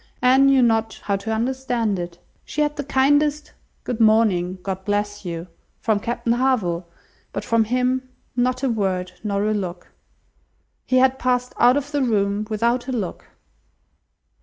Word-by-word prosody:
Anne 265 +2 +6
knew 270 -2 +5
not 225 -1 +1
how 200 - 0
to 200 +3 -4
understand 235 -3 -1
it. 175 -1 -6 0.3
She 300 - -3
had 295 0 +1
the 285 - -3
kindest 290 +2 +2 0.3
"Good 245 -2 -4
morning, 215 -5 +3
God 190 -1 -4
bless 205 0 -2
you!" 170 -1 -4 0.3
from 220 -2 +1
Captain 235 +1 -1
Harville, 215 -10 0 0.4
but - - -5
from 230 -1 +2
him 255 +2 0 0.3
not 250 +1 0
a 270 - +2
word, 185 -4 -1
nor 200 -1 0
a 215 - +1
look! 180 -4 -5 1.0
He 255 - +3
had 260 +1 +3
passed 250 0 0
out 245 +3 +6
of 285 0 -4
the 290 -1 0
room 210 -3 0
without 235 +3 0
a - - -2
look! 215 -8 -4
230 Hz, 160 wpm, -22 LUFS, 200-255 Hz, 1.0 s, Anne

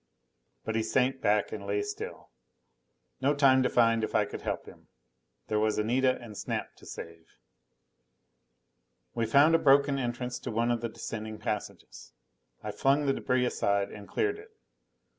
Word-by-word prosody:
But 110 - -2
he 110 - +2
sank 130 +3 +1
back 105 0 +2
and 100 -2 -6
lay 100 0 0
still. 105 - -7 0.9
No 140 +2 +2
time 135 -2 +5
to 130 - +2
find 115 -2 +3
if - - -3
I - - +4
could - - -7
help - - -3
him: - - -15 0.6
there 105 - 0
was 110 0 +1
Anita 130 +4 +2
and 115 -3 -10
Snap - - -4
to - - -15
save. 85 -1 -9 1.9
We 115 -1 -1
found 140 +7 +5
a 165 - +5
broken 140 -1 +4
entrance 125 0 -3
to - - -6
one 115 +2 +1
of 120 -2 -1
the 115 - -2
descending 110 -1 -6
passages. 105 -1 -6 0.5
I - - -3
flung 140 +2 +2
the 135 - +2
debris 125 -1 +1
aside 100 -4 0
and 105 -1 -10
cleared 420 0 0
it. 440 +1 -13
120 Hz, 165 wpm, -29 LUFS, 110-135 Hz, 1.9 s, time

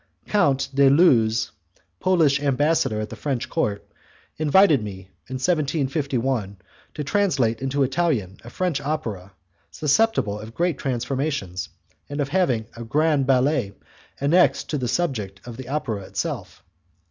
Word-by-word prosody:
Count 145 -10 +2
de 140 0 +5
Looz, 115 -8 +4 0.5
Polish 160 -7 +3
ambassador 145 -4 +1
at 110 - -4
the - - -6
French 135 -5 -3
court, 105 -11 -2 0.5
invited 155 - +4
me 95 -2 -8 0.2
in 130 - -4
1751 135 - -1 0.4
to 150 - -3
translate 140 - +1
into 135 +1 0
Italian 130 - 0
a 120 - -10
French 165 0 -1
opera 115 -11 -4 0.4
susceptible 145 - +1
of 110 +2 -10
great 170 -4 0
transformations, 130 - -2 0.4
and 145 +1 -5
of 140 -1 -1
having 140 -10 +1
a 115 - -7
grand 145 +2 +1
ballet 130 -5 +2 0.5
annexed 165 +6 +3
to 150 - -1
the 125 - -2
subject 110 - -2
of 120 -2 -8
the 130 0 -9
opera 120 -8 -2
itself. 95 - -5
135 Hz, 135 wpm, -23 LUFS, 115-155 Hz, 0.5 s, de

